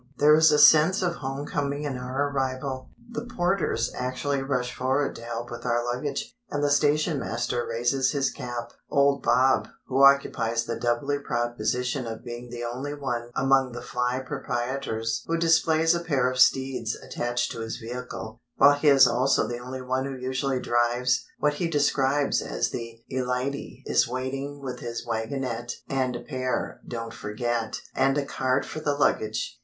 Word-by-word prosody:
There 150 +1 +6
is 160 0 +6
a 150 - +4
sense 160 +6 +6
of 175 -1 +1
home 135 +1 -4
coming 145 0 -2
in 145 -3 -2
our 130 +3 -2
arrival. 130 -1 -2 0.2
The 230 - -4
porters 175 - 0
actually 130 +2 -2
rush 125 -2 -1
forward 135 +3 0
to - - -10
help 120 0 -5
with 120 -1 -7
our 120 -1 0
luggage, 130 - -3
and 145 0 -2
the 145 - +2
station 150 +1 +2
master 120 0 -2
raises 120 +3 +1
his 140 -2 0
cap. 120 -1 -6 0.2
Old 140 -1 +3
Bob—who 130 +1 +2
occupies 115 -4 +4
the 115 - -3
doubly 125 +4 0
proud 120 -3 -2
position 125 +3 -1
of 115 -1 -6
being 120 +1 -7
the 120 0 -6
only 130 +5 -4
one 120 -4 -3
among 135 -2 +3
the 120 - -6
fly 125 +1 -1
proprietors 120 -4 -2
who 165 - +1
displays 165 0 +3
a 170 - 0
pair 140 -7 +1
of 130 - -4
steeds 130 -3 +3
attached 120 0 -2
to - - -6
his 115 0 -4
vehicle, 120 -1 -7
while 140 +1 +7
he 145 +2 0
is 135 -2 +8
also 125 +3 +2
the 120 0 -4 0.3
one 130 +1 0
who 135 -1 -5
usually 130 +1 -1
drives 120 +1 +1
what 150 0 +2
he 170 +4 -1
describes 145 -2 +2
as - - -2
"the 115 -1 -6
e 130 0 0
light 125 +2 -1
y"—is 140 - -1
waiting 135 +3 -4
with 130 -2 -5
his 120 -1 -5
wagonette 120 +1 -3
(and 130 -2 -1
pair, 130 -2 -2
don't 115 -1 -5
forget) 115 +2 -3
and 135 +1 +2
a 145 - 0
cart 130 0 0
for - - -6
the 145 -2 0
luggage. 115 -3 0
130 Hz, 170 wpm, -26 LUFS, 120-140 Hz, 0.3 s, is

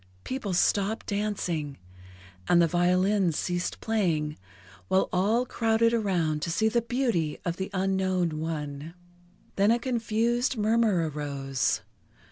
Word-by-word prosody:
People 210 -8 -3
stopped 200 +4 +1
dancing, 185 -8 -2 0.7
and 175 - +6
the 170 - +6
violins 180 +1 +2
ceased 175 0 -2
playing, 170 -9 0 0.5
while 190 - +2
all 210 +7 +2
crowded 230 -1 +2
around 175 -9 0
to 170 - -2
see 200 +7 +1
the 235 +2 +2
beauty 230 - -1
of 175 0 -2
the 190 +1 -3
unknown 185 -4 0
one. 155 0 -5 0.6
Then 200 +1 +4
a 230 - +4
confused 235 0 0
murmur 215 -5 +2
arose. 140 -3 -2
190 Hz, 120 wpm, -27 LUFS, 165-220 Hz, 0.7 s, and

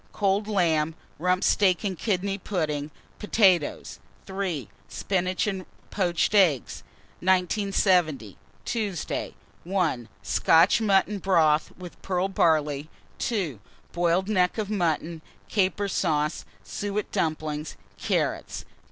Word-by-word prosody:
Cold 200 +1 +1
lamb, 165 -6 +1 0.2
Rump 180 +2 +1
steak 190 -2 +3
and 195 -3 -1
kidney 195 +1 -1
pudding, 155 -7 -2 0.3
potatoes. 190 -7 +2 0.3
3. 190 - -3 0.2
Spinach 185 -2 -1
and 190 -3 -3 0.2
poached 180 -1 0
eggs. 175 - +3 0.4
1970. 180 - +1 0.3
Tuesday. 210 -7 -3 0.3
1. 170 - -1
Scotch 170 +7 +4
mutton 200 -1 +2
broth 160 -5 +2
with 180 -1 -11
pearl 185 0 0
barley. 155 -5 +1 0.3
2. 180 - -2 0.3
Boiled 175 +2 +1
neck 185 -3 +1
of 215 -1 -3
mutton, 165 -4 -1 0.3
caper 200 0 +1
sauce, 155 -5 -1 0.2
suet 205 +1 -4
dumplings, 155 -4 -2 0.2
carrots. - - -2
180 Hz, 100 wpm, -26 LUFS, 160-195 Hz, 0.4 s, Scotch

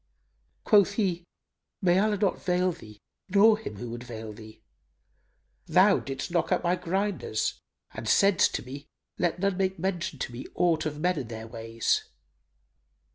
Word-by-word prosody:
Quoth 200 -2 +5
he, 185 -5 0 0.6
"May 180 0 +3
Allah 210 0 +2
not 200 -2 0
veil 180 0 +1
thee 110 -12 -12 0.3
nor 210 +3 +6
him 220 - -7
who 115 +3 -7
would 120 +1 -6
veil 110 -3 -7
thee! 110 +1 -13 1.0
Thou - - +5
didst 135 +4 -5
knock 175 +1 0
out 180 - +2
my 175 +1 +2
grinders 180 - -2 0.3
and - - -5
saidst 195 -3 +4
to - - -3
me, 140 +3 -9 0.3
'Let 175 -1 +1
none 195 0 0
make 190 0 0
mention 175 -4 -2
to 125 - -4
me 120 +2 -8
aught 165 -3 +2
of 150 -1 -5
men 180 0 +1
and 120 - -6
their 110 -1 -7
ways! 115 0 -1
175 Hz, 160 wpm, -27 LUFS, 120-190 Hz, 1.0 s, nor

